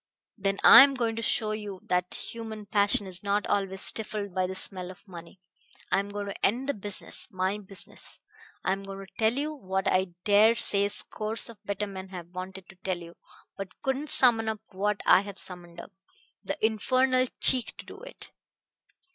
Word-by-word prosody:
"Then 195 -2 -1
I - - +11
am 275 0 +5
going 230 -3 -1
to - - -2
show 220 -1 0
you 210 -3 -6
that 180 0 -1
human 220 -2 -7
passion 205 0 +2
is 185 -1 -5
not 205 0 0
always 195 -1 -1
stifled 210 -3 -1
by 185 0 0
the 190 - -6
smell 185 -1 0
of 200 +2 -14
money. 175 0 -12 0.5
I - - +3
am 200 +1 -4
going 205 0 -5
to 200 - -8
end 245 +6 +1
the 285 - 0
business 205 +3 0
my 190 +2 -1
business. 195 -1 -4 0.4
I - - 0
am 195 +1 -2
going 195 0 -8
to 190 - -24
tell 220 0 +3
you 295 +4 -2
what 190 -8 -3
I 185 0 +2 0.2
dare 215 +2 +5
say 200 -3 +3
scores 215 +3 -3
of 225 -3 -14
better 205 +1 -2
men 190 -1 -8
have 180 -3 -9
wanted 185 +1 -8
to 195 - -15
tell 185 0 -3
you, 170 -1 -11 0.4
but 195 -1 -9
couldn't 270 +3 -2
summon 225 -3 +4
up 220 -1 -4
what 205 +1 -1
I - - +6
have 200 -1 -9
summoned 175 -2 -9
up - - -10 0.5
the - - -4
infernal 255 +4 +2
cheek 255 -3 +5
to - - -10
do - - -12
it. - - -10
200 Hz, 195 wpm, -27 LUFS, 190-220 Hz, 0.5 s, I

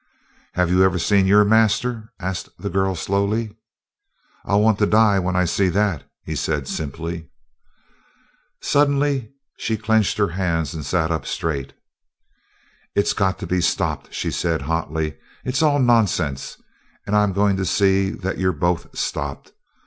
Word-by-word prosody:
"Have 90 -1 +1
you 90 +1 +4
ever 95 -1 +4
seen 95 +2 +3
your 105 +2 +6
master?" 110 +2 +2
asked 95 -1 -4
the 100 - -5
girl 95 -1 +1
slowly. 100 +4 -1 0.9
"I'll 100 - +2
want 110 -1 +3
to 105 - +3
die 105 -2 +4
when 90 0 -1
I 90 0 +3
see 95 +2 +1
that," 95 -5 0
he - - -5
said 75 -4 -2
simply. 80 +2 -5 1.3
Suddenly 140 -4 +2 0.3
she 110 - -1
clenched 110 -1 +1
her 105 -2 +2
hands 85 -4 -1
and 80 -2 -5
sat 80 +1 0 0.2
straight 75 -5 -2
up. - - -24 1.2
"It's 100 - +2
got 95 -2 0
to - - -3
be 90 -1 0
stopped," - - -1
she - - -3
said 80 -4 -1
hotly. 80 0 -2 0.3
"It's 130 +2 0
all 150 -2 +4
nonsense, 105 - +1 0.5
and 105 - -1
I'm 105 -1 +3
going 100 +1 +2
to 95 - -1
see 95 +1 +2
that 95 0 -4
you're 95 -1 +1
both 85 +2 -2
stopped." - - -4
95 Hz, 150 wpm, -21 LUFS, 85-105 Hz, 1.3 s, your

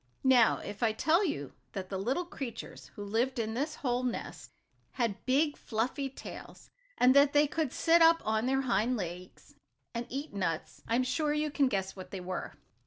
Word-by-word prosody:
Now 255 -4 +5
if 205 +2 -8
I 225 -2 +3
tell 320 - +3
you 145 - -3 0.2
that 190 -2 -5
the 190 - -3
little 260 - -1
creatures 255 -9 -7
who 205 - -6
lived 235 +6 0
in 220 -1 -1
this 290 +6 -2
hole 245 -2 -1
nest 250 -2 -4 0.4
had 230 -6 -1
big, 290 +3 +3
fluffy 250 +5 -2
tails, 265 - -10 0.3
and 255 +2 +5
that 280 0 +6
they 295 +1 +5
could 300 -2 -1
sit 335 0 +4
up 330 0 +7
on 220 +2 +1
their 270 +1 +2
hind 240 0 +1
legs, 180 -1 -7 0.4
and 235 0 -4
eat 280 +1 -5
nuts, 170 -5 -3
I 230 - +1
am 255 - +3
sure 295 +4 0
you 300 0 0
can 280 -2 +3
guess 195 -5 -2
what 185 -1 -9
they 195 - -5
were. 180 +1 -5
250 Hz, 190 wpm, -31 LUFS, 210-285 Hz, 0.4 s, up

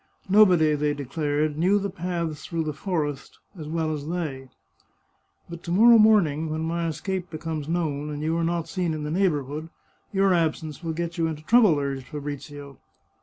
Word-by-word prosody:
Nobody, 185 -6 +5
they 150 0 0
declared, 145 +2 -2
knew 190 +5 +4
the 200 -1 -2
paths 170 -4 -4
through 165 -2 -2
the 155 -1 -3
forest 150 -5 -3 0.2
as 155 -4 -8
well 160 0 -1
as 145 -1 -5
they! 145 -7 -4 0.5
" - - -44
But 170 -1 -9
to 170 - -4
morrow 230 +5 +7
morning, 165 -8 +4
when 155 +1 -3
my 165 +1 -1
escape 185 +3 -3
becomes 155 -2 -5
known, 150 -4 -1
and 150 0 -5
you 160 +1 0
are 170 - 0
not 170 0 -1
seen 175 -2 -2
in 155 - -5
the 150 - -3
neighbourhood, 155 -4 -1 0.4
your 195 -1 +3
absence 160 -1 -1
will 165 -1 -2
get 170 +1 -4
you 165 - +2
into 155 -1 -5
trouble," 215 -4 +5
urged 140 -2 -3
Fabrizio. 145 -1 -7
160 Hz, 180 wpm, -25 LUFS, 150-175 Hz, 0.5 s, morrow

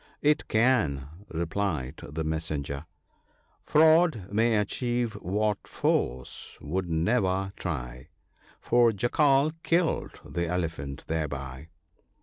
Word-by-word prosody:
" - - -44
It 150 - -13
can," 80 - +2 0.2
replied 80 -5 -2
the 75 +3 -4
messenger, 75 -2 -3 0.2
— - - -39
" - - -39
Fraud 155 - +4
may 115 +1 +3
achieve 120 +2 -1
what 105 +3 -1
force 65 0 -1
would 90 +4 -3
never 95 +2 +1
try: 65 -5 -5 0.6
The 120 -2 +5
Jackal 135 +6 +3
killed 170 -1 0
the 85 0 -2
Elephant 80 -6 -3
thereby. 70 -3 -4
90 Hz, 110 wpm, -28 LUFS, 75-120 Hz, 0.6 s, The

